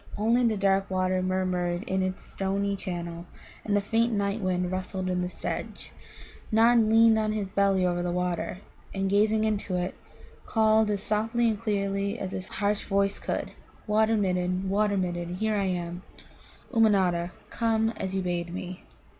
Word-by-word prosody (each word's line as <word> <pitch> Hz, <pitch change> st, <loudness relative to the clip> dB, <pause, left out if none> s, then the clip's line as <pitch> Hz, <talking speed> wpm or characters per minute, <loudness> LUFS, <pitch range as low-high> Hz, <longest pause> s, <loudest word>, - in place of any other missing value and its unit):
Only 230 Hz, +4 st, +3 dB
the 220 Hz, -2 st, 0 dB
dark 195 Hz, 0 st, +2 dB
water 185 Hz, 0 st, +1 dB
murmured 185 Hz, -1 st, -1 dB
in 190 Hz, -5 st, -1 dB
its 185 Hz, 0 st, -3 dB
stony 200 Hz, +1 st, -1 dB
channel, 175 Hz, -2 st, -5 dB, 0.4 s
and 205 Hz, -1 st, +1 dB
the -, -, +2 dB
faint 225 Hz, +3 st, +1 dB
night 200 Hz, 0 st, -1 dB
wind 180 Hz, -1 st, 0 dB
rustled 185 Hz, 0 st, -3 dB
in 180 Hz, 0 st, 0 dB
the 180 Hz, -, -2 dB
sedge. -, -, -5 dB, 0.6 s
Nod 230 Hz, +2 st, +5 dB
leaned 225 Hz, 0 st, +6 dB
on 215 Hz, 0 st, 0 dB
his 210 Hz, -2 st, -1 dB
belly 195 Hz, -1 st, +2 dB
over 175 Hz, -1 st, 0 dB
the 175 Hz, -, -1 dB
water, 180 Hz, +1 st, -2 dB, 0.3 s
and, 195 Hz, 0 st, -1 dB
gazing 215 Hz, +2 st, +3 dB
into 205 Hz, -3 st, -1 dB
it, 180 Hz, +1 st, -1 dB, 0.5 s
called 220 Hz, -1 st, +3 dB
as 205 Hz, -1 st, -1 dB
softly 225 Hz, +3 st, +1 dB
and 215 Hz, -2 st, -2 dB
clearly 200 Hz, -1 st, -1 dB
as 190 Hz, -4 st, -4 dB
his 185 Hz, 0 st, -5 dB
harsh 205 Hz, 0 st, -1 dB
voice 200 Hz, 0 st, +1 dB
could: -, -, -3 dB, 0.3 s
"Water 220 Hz, +1 st, +3 dB
midden, 185 Hz, -1 st, 0 dB
Water 205 Hz, 0 st, +2 dB
midden, 175 Hz, -1 st, -2 dB
here 220 Hz, +3 st, 0 dB
am 180 Hz, -3 st, -2 dB, 0.2 s
I, -, -, -20 dB
Ummanodda, 185 Hz, -6 st, +3 dB, 0.2 s
come 225 Hz, -1 st, +1 dB
as 190 Hz, -4 st, -4 dB
you 190 Hz, -, 0 dB
bade 175 Hz, -1 st, -2 dB
me." 185 Hz, 0 st, -6 dB
195 Hz, 165 wpm, -27 LUFS, 185-215 Hz, 0.6 s, leaned